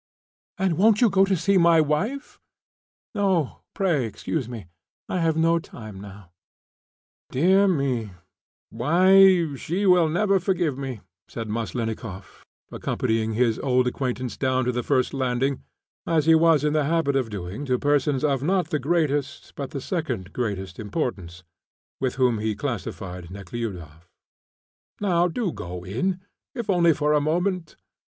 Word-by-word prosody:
"And 185 Hz, -4 st, 0 dB
won't 210 Hz, +1 st, +5 dB
you 235 Hz, -4 st, +4 dB
go 190 Hz, -, +1 dB
in -, -, +7 dB
to 195 Hz, -, +2 dB
see 190 Hz, +4 st, +2 dB
my 170 Hz, -1 st, +5 dB
wife?" 185 Hz, -, -1 dB, 0.7 s
"No, 190 Hz, -, 0 dB
pray 170 Hz, -10 st, +1 dB
excuse 125 Hz, +4 st, -4 dB
me; 115 Hz, -6 st, -7 dB, 0.4 s
I 185 Hz, -, -2 dB
have 165 Hz, -1 st, +1 dB
no 165 Hz, +1 st, +3 dB
time 110 Hz, -10 st, -10 dB
now." 100 Hz, -3 st, -12 dB, 1.0 s
"Dear 190 Hz, +8 st, +4 dB
me, 135 Hz, -, 0 dB, 0.6 s
why 185 Hz, 0 st, +5 dB
she 180 Hz, +9 st, -2 dB
will 180 Hz, -4 st, +5 dB
never 195 Hz, +4 st, +2 dB
forgive 175 Hz, -6 st, 0 dB
me," 130 Hz, -5 st, -6 dB, 0.3 s
said 115 Hz, -2 st, -6 dB
Maslennikoff, 110 Hz, -, -5 dB, 0.3 s
accompanying 110 Hz, 0 st, -1 dB
his 115 Hz, 0 st, +1 dB
old 130 Hz, -2 st, +2 dB
acquaintance 125 Hz, -2 st, -3 dB
down 130 Hz, -1 st, 0 dB
to 125 Hz, -, +1 dB
the 125 Hz, 0 st, -2 dB
first 130 Hz, +2 st, 0 dB
landing, 130 Hz, 0 st, -1 dB, 0.5 s
as 160 Hz, -3 st, +2 dB
he 165 Hz, -, +6 dB
was 160 Hz, -2 st, +4 dB
in 150 Hz, 0 st, +1 dB
the 155 Hz, -2 st, +2 dB
habit 160 Hz, -2 st, +1 dB
of 130 Hz, -4 st, 0 dB
doing 100 Hz, +5 st, -6 dB
to 130 Hz, -2 st, +1 dB
persons 145 Hz, 0 st, +1 dB
of 140 Hz, -4 st, +1 dB
not 180 Hz, +5 st, 0 dB
the 150 Hz, -, +1 dB
greatest, 145 Hz, -2 st, -1 dB
but 140 Hz, -2 st, -5 dB
the 140 Hz, -, -5 dB
second 130 Hz, -, -4 dB
greatest 95 Hz, -6 st, -4 dB
importance, 100 Hz, -, -4 dB, 0.6 s
with 130 Hz, -2 st, -1 dB
whom 125 Hz, -4 st, +2 dB
he 110 Hz, 0 st, -1 dB
classed 120 Hz, -1 st, -3 dB, 0.4 s
Nekhludoff; 90 Hz, -5 st, -7 dB, 0.9 s
"now 180 Hz, -4 st, +2 dB
do 190 Hz, +1 st, -2 dB
go 90 Hz, -, -7 dB
in, 180 Hz, -, -2 dB, 0.3 s
if 235 Hz, -5 st, -2 dB
only 170 Hz, -2 st, +4 dB
for 150 Hz, 0 st, +1 dB
a 150 Hz, -, +3 dB
moment." 175 Hz, +2 st, -1 dB
140 Hz, 150 wpm, -24 LUFS, 115-170 Hz, 1.0 s, in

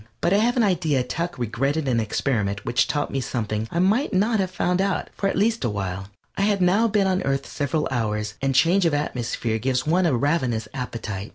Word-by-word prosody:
But 175 Hz, -, +1 dB
I -, -, +5 dB
have 240 Hz, +4 st, +2 dB
an 240 Hz, -, +4 dB
idea 165 Hz, -9 st, +1 dB
Tuck 170 Hz, +7 st, -4 dB
regretted 135 Hz, +6 st, -1 dB
an 120 Hz, -3 st, +2 dB
experiment 105 Hz, -2 st, -1 dB
which 120 Hz, -, +2 dB
taught 145 Hz, -1 st, -1 dB
me 135 Hz, -, -1 dB
something 110 Hz, -3 st, -3 dB
I -, -, -4 dB
might 200 Hz, -, +2 dB
not 215 Hz, +3 st, +2 dB
have 190 Hz, -1 st, 0 dB
found 180 Hz, 0 st, 0 dB
out, 195 Hz, -1 st, -1 dB
at 195 Hz, -1 st, +1 dB
least 225 Hz, +3 st, +2 dB
for -, -, 0 dB
a -, -, -1 dB
while. 95 Hz, -2 st, -4 dB, 0.3 s
I -, -, -2 dB
had 200 Hz, 0 st, +2 dB
now 190 Hz, +6 st, +3 dB
been 205 Hz, -2 st, +2 dB
on 190 Hz, 0 st, +1 dB
Earth 135 Hz, 0 st, -1 dB
several 150 Hz, +1 st, -2 dB
hours, 105 Hz, -4 st, -1 dB
and 135 Hz, -1 st, 0 dB
change 170 Hz, +6 st, +4 dB
of 155 Hz, -, +1 dB
atmosphere 120 Hz, -5 st, -2 dB
gives 130 Hz, +2 st, 0 dB
one 175 Hz, +3 st, +2 dB
a 135 Hz, -7 st, +2 dB
ravenous 125 Hz, -6 st, 0 dB
appetite. 115 Hz, -6 st, -5 dB
145 Hz, 215 wpm, -23 LUFS, 115-185 Hz, 0.3 s, I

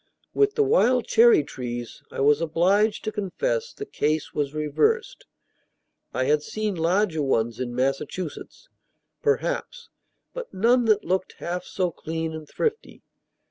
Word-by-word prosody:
With 415 Hz, 0 st, +2 dB
the 440 Hz, -, +4 dB
wild 255 Hz, -, +3 dB
cherry 230 Hz, -8 st, +5 dB
trees, 120 Hz, -3 st, -6 dB
I -, -, -4 dB
was 145 Hz, +2 st, +4 dB
obliged 190 Hz, +7 st, +2 dB
to 215 Hz, -, -2 dB
confess, 465 Hz, -, -2 dB
the 420 Hz, -, -7 dB
case 155 Hz, -, -1 dB
was 145 Hz, -2 st, -1 dB
reversed. 435 Hz, -, 0 dB, 0.8 s
I 130 Hz, -, -1 dB
had 150 Hz, +3 st, +2 dB
seen 215 Hz, +6 st, -3 dB
larger 170 Hz, 0 st, +1 dB
ones 115 Hz, -4 st, 0 dB
in 120 Hz, -1 st, -4 dB
Massachusetts, 135 Hz, -, -3 dB, 0.5 s
perhaps, 465 Hz, +2 st, -1 dB, 0.4 s
but -, -, -7 dB
none 235 Hz, +5 st, +3 dB
that 215 Hz, -2 st, +3 dB
looked 185 Hz, +2 st, -1 dB
half 180 Hz, +1 st, -5 dB
so 180 Hz, -2 st, -1 dB
clean 160 Hz, 0 st, -4 dB
and 155 Hz, -2 st, -8 dB
thrifty. 450 Hz, -1 st, -3 dB
180 Hz, 140 wpm, -25 LUFS, 150-245 Hz, 0.8 s, cherry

